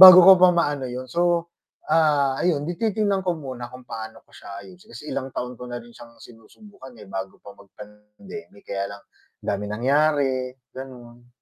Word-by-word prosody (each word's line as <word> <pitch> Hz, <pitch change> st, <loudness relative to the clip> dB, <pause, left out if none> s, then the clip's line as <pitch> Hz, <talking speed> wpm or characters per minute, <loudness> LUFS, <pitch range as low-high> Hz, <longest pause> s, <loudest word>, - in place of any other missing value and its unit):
bago 185 Hz, -1 st, +13 dB
ko 190 Hz, -, +11 dB
pa 185 Hz, -, +9 dB
maano 145 Hz, -6 st, 0 dB
yun 125 Hz, +1 st, -5 dB
so 170 Hz, +3 st, +1 dB, 0.4 s
ah, 150 Hz, -4 st, +4 dB
ayun 155 Hz, -5 st, +1 dB
'di 175 Hz, -, -2 dB
titignan 210 Hz, -3 st, +1 dB
ko 180 Hz, -2 st, -1 dB
muna 130 Hz, -5 st, -7 dB
kung 125 Hz, +1 st, -12 dB
paano 110 Hz, -2 st, -8 dB
ko -, -, -29 dB
siya 100 Hz, 0 st, -10 dB
ayusin 90 Hz, -1 st, -16 dB
kasi -, -, -9 dB
ilang 135 Hz, -1 st, -3 dB
taon 125 Hz, -1 st, -4 dB
ko 125 Hz, -, -7 dB
na 120 Hz, -, -5 dB
rin 120 Hz, 0 st, -10 dB
siyang 115 Hz, 0 st, -14 dB
sinusubukan 130 Hz, -, -15 dB
eh, 105 Hz, -, -12 dB
bago 95 Hz, 0 st, -5 dB
pa 100 Hz, -, -10 dB
mag-pandemic 105 Hz, -, -13 dB
kaya 100 Hz, 0 st, -3 dB
lang, 100 Hz, -, -18 dB, 0.4 s
daming 105 Hz, +1 st, -2 dB
nangyari, 135 Hz, -1 st, +2 dB, 0.2 s
ganon. 120 Hz, -2 st, -11 dB
130 Hz, 180 wpm, -24 LUFS, 115-160 Hz, 0.4 s, bago